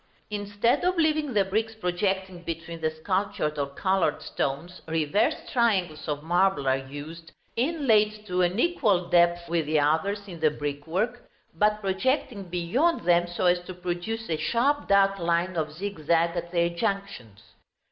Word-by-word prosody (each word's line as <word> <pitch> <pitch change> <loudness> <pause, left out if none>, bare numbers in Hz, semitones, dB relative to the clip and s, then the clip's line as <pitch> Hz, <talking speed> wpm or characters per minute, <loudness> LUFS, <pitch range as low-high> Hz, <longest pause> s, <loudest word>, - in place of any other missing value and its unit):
Instead 205 +5 0
of 365 0 +1
leaving 310 -5 +1
the 200 -2 +4
bricks 220 +3 -1
projecting 190 -1 -2
between 165 0 -6
the 160 - +1
sculptured 155 -2 -2
or 140 - 0
colored 185 +2 0
stones, 160 +7 -3
reversed 160 +7 0
triangles 195 -10 +1
of 150 -1 -3
marble 175 -3 +2
are 130 - +4
used, 145 +5 -8 0.2
inlaid 225 -7 +2
to 180 -2 0
an 180 +4 +1
equal 215 - +2
depth 175 0 +3
with 165 -2 0
the 155 0 +2
others 195 +8 0
in 175 -3 -9
the 155 -1 +4
brickwork, 160 +12 -3 0.2
but 210 +5 +2
projecting 210 +3 0
beyond 180 - +1
them 175 0 +3
so 175 +1 -2
as 175 0 +4
to 180 +1 -9
produce 180 +6 -4
a 160 - -1
sharp 245 - +1
dark 195 0 +4
line 170 +2 0
of 155 -2 -1
zigzag 170 -1 0
at 170 0 -4
their 170 -1 +2
junctions. 170 - -4
180 Hz, 155 wpm, -26 LUFS, 165-210 Hz, 0.2 s, the